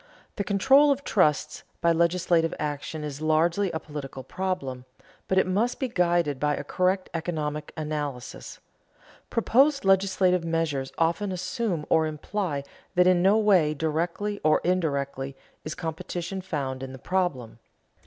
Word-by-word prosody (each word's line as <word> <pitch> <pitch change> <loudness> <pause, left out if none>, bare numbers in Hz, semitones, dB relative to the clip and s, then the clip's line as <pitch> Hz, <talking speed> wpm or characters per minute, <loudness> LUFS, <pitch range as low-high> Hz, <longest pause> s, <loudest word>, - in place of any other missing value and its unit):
The 200 - 0
control 265 +9 +5
of 280 0 +1
trusts 155 - +1 0.2
by 170 - +3
legislative 170 0 +2
action 150 +1 -4
is 150 0 -6
largely 165 +5 +2
a 160 - -3
political 140 -4 -7
problem, 140 -10 -3 0.4
but 190 - +1
it 190 - +5
must 210 +7 0
be 265 - 0
guided 175 - +1
by 150 +1 +1
a - - -5
correct 185 +1 0
economic 155 -3 -3
analysis. 150 -5 -5 0.7
Proposed 270 +3 +3
legislative 190 -2 +3
measures 165 -5 -1
often 170 +5 +1
assume 185 -2 -2
or 160 -1 +3
imply 155 -1 -3 0.3
that 180 0 +5
in 180 -1 +4
no 195 +4 +5
way, 185 -8 +4
directly 170 +7 -2
or 155 0 +4
indirectly, 140 -6 -1 0.3
is 155 - -5
competition 175 +2 -4
found 140 -8 -3
in 135 0 -6
the - - -8
problem. 135 -10 -2
170 Hz, 140 wpm, -26 LUFS, 150-190 Hz, 0.7 s, control